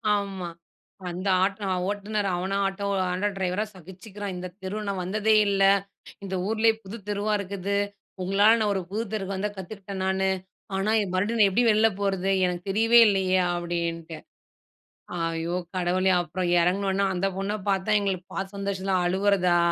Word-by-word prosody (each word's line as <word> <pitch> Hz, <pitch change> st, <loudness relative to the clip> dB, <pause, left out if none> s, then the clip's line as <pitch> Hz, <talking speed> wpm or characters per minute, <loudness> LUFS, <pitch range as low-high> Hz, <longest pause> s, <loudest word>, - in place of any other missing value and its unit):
ஆமா, 195 Hz, -3 st, -3 dB, 0.6 s
அந்த 185 Hz, +3 st, -4 dB, 0.2 s
ஆட்டோ 195 Hz, +1 st, -1 dB, 0.2 s
ஓட்டுநர் 205 Hz, 0 st, -2 dB
அவன 190 Hz, +3 st, -1 dB
ஆட்டோ, 195 Hz, +1 st, -2 dB, 0.3 s
ஆட்டோ 190 Hz, +3 st, 0 dB
டிரைவரா 190 Hz, +3 st, -1 dB
சகிச்சுக்குறான். 190 Hz, +3 st, -8 dB
இந்த 185 Hz, +1 st, -5 dB
தெரு 190 Hz, +3 st, -4 dB
நான் 195 Hz, -2 st, -2 dB
வந்ததே 215 Hz, +3 st, +2 dB
இல்ல, 195 Hz, -1 st, +2 dB, 0.6 s
இந்த 190 Hz, -1 st, -4 dB
ஊர்லயே 225 Hz, +1 st, +3 dB
புதுத் 200 Hz, +1 st, -9 dB
தெருவா 205 Hz, +1 st, 0 dB
இருக்குது. 200 Hz, 0 st, -2 dB, 0.4 s
உங்களால 200 Hz, +5 st, +4 dB
நான் 210 Hz, -2 st, +1 dB
ஒரு 190 Hz, -, 0 dB
புது 220 Hz, +2 st, -1 dB
தெருவுக்கு 195 Hz, -2 st, -2 dB
வந்த 205 Hz, +2 st, -1 dB
கத்துக்குட்டேன் 195 Hz, 0 st, -6 dB
நானு, 190 Hz, 0 st, +1 dB, 0.5 s
ஆனா 195 Hz, +3 st, 0 dB, 0.2 s
மறுபடியும் 210 Hz, +5 st, 0 dB
நான் 200 Hz, -, +6 dB
எப்டி 240 Hz, +5 st, +3 dB
வெள்ள 215 Hz, +1 st, +5 dB
போறது? 195 Hz, -1 st, 0 dB
எனக்கு 180 Hz, 0 st, -2 dB
தெரியவே 225 Hz, +3 st, +5 dB
இல்லயே 190 Hz, -2 st, +2 dB, 0.2 s
அப்டின்ட்டு. 170 Hz, -2 st, -3 dB, 1.0 s
ஐயோ! 165 Hz, +1 st, -1 dB, 0.2 s
கடவுளே 185 Hz, +1 st, +2 dB
அப்புறம் 175 Hz, +2 st, -3 dB
இறங்குனொன்னே 195 Hz, +2 st, +1 dB
அந்த 185 Hz, +2 st, 0 dB
பொண்ண 195 Hz, +2 st, -2 dB
பாத்தா 195 Hz, +2 st, +1 dB
எங்களுக்கு 185 Hz, -3 st, -2 dB
பாத்த 195 Hz, +1 st, -4 dB
சந்தோஷம் 195 Hz, -1 st, -3 dB
தான் 185 Hz, -1 st, +2 dB
அழுவறதா? 185 Hz, -2 st, +3 dB
195 Hz, 150 wpm, -26 LUFS, 185-205 Hz, 1.0 s, நான்